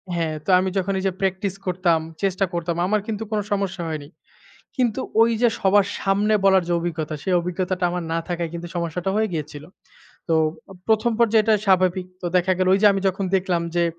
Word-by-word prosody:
হ্যাঁ, 160 -2 -1
তো - - -6
আমি 190 0 0
যখনই 190 0 -1
যে - - +1
প্র্যাকটিস 190 0 -1
করতাম, 180 -2 +1 0.2
চেষ্টা 195 0 +1
করতাম 170 0 -2
আমার 210 0 +1
কিন্তু 220 0 -3
কোনো 210 -1 0
সমস্যা 195 -2 -1
হয়নি। 150 -2 -5 0.7
কিন্তু 245 -5 0 0.2
ওইযে 230 +1 +3
সবার 195 +1 +4
সামনে 205 +2 +1
বলার 190 -2 +5
যে 175 - 0
অভিজ্ঞতা 160 -3 -3
সেই 185 - 0
অভিজ্ঞতাটা 180 +1 -2
আমার 180 -1 -3
না 165 - 0
থাকায় 170 -2 -2
কিন্তু 170 0 -6
সমস্যাটা 170 +2 -2
হয়ে 220 0 +2
গিয়েছিল। 150 -2 -5 0.6
তো 165 - +2 0.4
ও - - -10
১ম 220 +2 +2
পর্যায়ে 220 -2 +4
এটা 220 -1 +4
স্বাভাবিক। 185 -1 +3 0.2
তো - - -5
দেখা 185 +1 +2
গেলো 185 0 +2
ওইযে 205 +2 +5
আমি 195 - -1
যখন 190 +1 -1
দেখলাম 180 -2 0
যে 170 - +3
185 Hz, 190 wpm, -22 LUFS, 175-200 Hz, 0.7 s, বলার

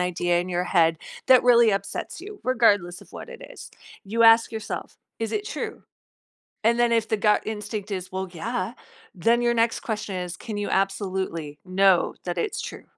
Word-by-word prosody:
idea 175 -1 +1
in 180 - -5
your 180 0 0
head 165 -3 +3 0.3
that 255 -1 +7
really 235 -2 +6
upsets 200 - -4
you, 410 +2 -10
regardless 205 -8 +2
of - - -17
what - - -9
it 480 0 -10
is. - - -11 0.3
You 225 +4 0
ask 225 0 +6
yourself, 220 -1 -6 0.2
"Is 225 - -3
it 420 0 -2
true?" - - -5 0.8
And 235 +1 +3
then 240 -1 +3
if 225 -1 +2
the 220 - +1
gut 210 0 +2
instinct 210 -1 -5
is, 185 -1 -4
"Well, 190 0 -4
yeah." 235 +7 -3 0.4
Then 230 +7 +2
your 240 0 +2
next 230 0 +1
question 210 -3 -4
is, 180 -1 -5
"Can 215 -3 -7
you 205 - -2
absolutely 190 -6 -2
know 190 0 +3
that 175 -1 -3
it's - - -2
true?" - - -8
205 Hz, 185 wpm, -24 LUFS, 180-230 Hz, 0.8 s, that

